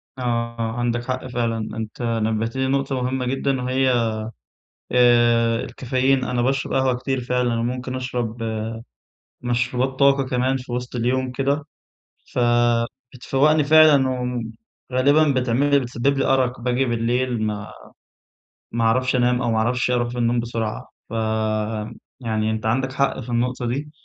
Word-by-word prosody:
آه، 130 - -8 0.4
آه، 115 -1 -1
عندك 120 0 -1
حق 130 0 -3
فعلًا، 115 -2 -1 0.2
أنت 110 +2 -6
نبهتني 115 +2 -1
لنقطة 135 -1 0
مهمّة 130 +1 -1
جدًا 135 +1 -1
وهي 125 -2 +1 0.8
آآ، 120 -1 +4
الكافيين، 130 +1 0
أنا 125 -1 -1
باشرب 135 +2 0
قهوة 130 -1 +2
كتير 130 +1 -2
فعلًا، 125 -1 0
وممكن 125 +2 -3
أشرب 120 -3 -3 1.0
مشروبات 125 +2 -1
طاقة 140 0 +4
كمان 130 +1 0
في 125 -1 -9
وسط 125 +1 -4
اليوم 125 +2 0
كده، 140 +3 0 0.7
فبتفوّقني 125 +5 +1
فعلًا 150 -3 +6 0.8
وغالبًا 140 +1 +3
بتعمل 125 +4 +1
لي 140 - +6
بتسبب 130 +2 -1
لي 135 - +1
أرق، 130 -2 +1
باجي 125 +2 +1
بالليل 120 0 0
ما 105 -1 -3 1.0
ما 115 0 -1
اعرفش 125 +3 +2
أنام، 125 0 +2
أو 120 -2 0
ما 110 - +1
اعرفش 125 +3 +1
أروح 120 -1 +1
في 125 - -7
النوم 120 0 +1
بسرعة، 115 -2 -3 0.2
فيعني 110 0 -2
أنت 110 0 -4
عندك 130 +4 0
حق 140 0 0
في 125 -1 -8
النقطة 125 +1 -1
دي. 140 +5 -3
125 Hz, 135 wpm, -22 LUFS, 115-130 Hz, 1.0 s, فعلًا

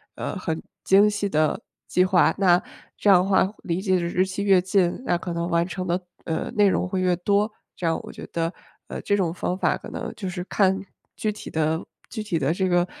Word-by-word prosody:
呃， - - -4
很 165 -3 -3 0.2
精 200 +2 +6
细 205 -1 -1
的 155 -3 +1 0.3
计 180 - +3
划， 185 -2 +4
那 180 -3 +4 0.4
这 205 - +2
样 180 -2 +7
的 - - -2
话 190 0 +3
离 175 +1 -1
这 190 -2 +2
个 180 - +1
日 175 +2 +1
期 190 +1 -4
越 195 -3 +5
近， 185 0 +1
那 175 - +2
可 175 0 -5
能 170 +1 -2
完 170 -1 +2
成 185 +1 -5
的， 175 +1 +1 0.3
呃， 160 - -2
内 205 -1 +4
容 185 - +1
会 185 0 -2
越 180 -1 +2
多。 200 +4 +1 0.3
这 175 - -2
样 165 - +1
我 - - -9
觉 - - -9
得， 165 +1 -1 0.3
呃， - - -5
这 205 - +1
种 175 -4 0
方 180 0 -2
法 - - +2
可 - - -10
能 - - -5
就 195 - -5
是 180 0 -4
看 190 -1 +2 0.4
具 215 - 0
体 210 - -9
的 160 +1 0 0.3
具 220 - -5
体 200 -6 -1
的 145 +2 +1
这 190 +1 0
个 175 0 +3
185 Hz, 250 characters per minute, -24 LUFS, 170-195 Hz, 0.4 s, 样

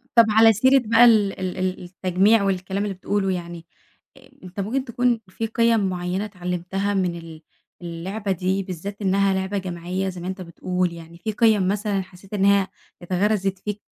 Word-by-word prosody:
طب 230 -1 +8
على 220 +1 +6
سيرة 260 +6 +4
بقى 230 +2 +6
ال 210 -5 +4
ال 185 -1 -3
ال 185 0 -2
التجميع 190 +4 +2
والكلام 190 0 -1
اللي 205 - -3
بتقوله 195 +1 -1
يعني، 170 -2 -6 0.5
أ - - -18
أنتَ 185 +2 -9
ممكن 245 +7 -1
تكون 245 -1 +1
في 225 +4 -4
قِيَم 230 -3 +2
معيّنة 180 +2 -2
اتعلمتها 185 +1 -3
من 185 -3 0
ال 165 -2 -11 0.4
اللعبة 185 +5 -4
دي 190 +2 0
بالذَّات 195 +3 -7
إنها 195 0 +2
لعبة 190 +1 -2
جماعية 185 +1 -3
زي 180 -1 -8
ما 175 - -5
أنتَ 190 0 -5
بتقول 180 +1 -2
يعني 165 0 -11
في 195 +6 -3
قِيَم 215 -3 +3
مثلًا 200 0 0
حسّيت 190 +2 -14
إنها 200 -1 +3 0.3
اتغرزت 195 +1 0
فيك؟ 210 +1 -5
190 Hz, 170 wpm, -23 LUFS, 180-210 Hz, 0.5 s, طب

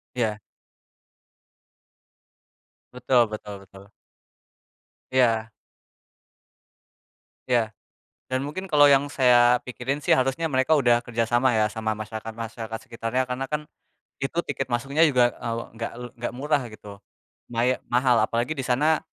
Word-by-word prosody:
Iya. 110 -3 -1 2.5
Betul 125 -1 +3
betul 105 -1 -6
betul. 95 +1 -16 1.2
Iya. 115 -3 +2 2.0
Iya. 115 -4 +1 0.5
Dan 130 +1 -2
mungkin 185 +6 -5
kalau 145 -4 +6
yang 140 +1 +4
saya 125 -2 +5
pikirin 130 +3 -4
sih, - - +4
harusnya 135 +5 0
mereka 130 +3 +1
udah 120 -4 +3
kerjasama 120 +2 +1
ya 110 -1 +3
sama 110 0 -2
masyarakat-masyarakat 110 +1 -6
sekitarnya 115 +2 -1
karena 125 +2 -3
kan 150 +1 -4 0.5
itu 135 +5 -3
tiket 135 - -3
masuknya 135 +6 0
juga, 125 -3 +3
eee, 115 -1 -3
enggak 115 0 -5
le 125 0 -6
enggak 120 - -3
murah 145 +1 +1
gitu. 105 -2 -12 0.5
Maya 120 +2 +1
mahal 125 0 +3
apalagi 115 +5 0
di 140 - -4
sana 145 +6 +2
120 Hz, 120 wpm, -25 LUFS, 115-130 Hz, 2.5 s, kalau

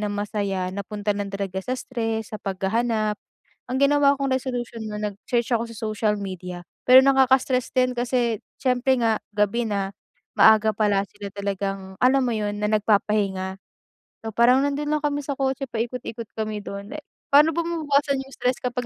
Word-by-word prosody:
na 210 - -1
masaya 200 -3 -2
napunta 205 +1 -2
lang 200 -1 -3
talaga 195 -1 -3
sa 255 +4 -2
stress, 225 -4 -3
sa - - -6
paghahanap. 215 +3 0 0.6
Ang 260 - 0
ginawa 280 0 +4
kong 270 -1 0
resolusyon 240 -4 -4
na 210 - -4
nag-search 220 +4 -2
ako 230 - 0
sa 225 - -11
social 215 -1 -1
media. 180 -2 -6 0.2
Pero 255 +1 +9
nakaka-stress 265 -1 +3
din 255 -1 +2
kasi 240 -3 0 0.2
siyempre 255 0 +2
nga 225 -2 +1
gabi 210 +3 +1
na. 200 -2 -2 0.5
Maaga 220 0 +6
pala 205 -2 +1
sila 205 -1 -9
talagang, 195 -1 -4
alam 265 +2 +4
mo 245 - 0
yun, 210 -2 -2
na - - +2
nagpapahinga. 200 -2 +1 0.6
So, 220 - -4
parang 250 +5 +4
nandun 285 +1 -1
lang 300 - -3
kami 290 -1 0
sa 280 -1 -4
kotse, 270 0 -1
paikot-ikot 230 -1 -4
kami 215 -1 -3
dun. 200 +2 -7
Eh 300 - -7 0.3
paano 300 +3 +7
ba 335 +1 -1
mababawasan 285 -4 +1
yung 270 - -16
stress 250 -1 -1
kapag 250 0 -2
225 Hz, 170 wpm, -24 LUFS, 205-260 Hz, 0.6 s, Pero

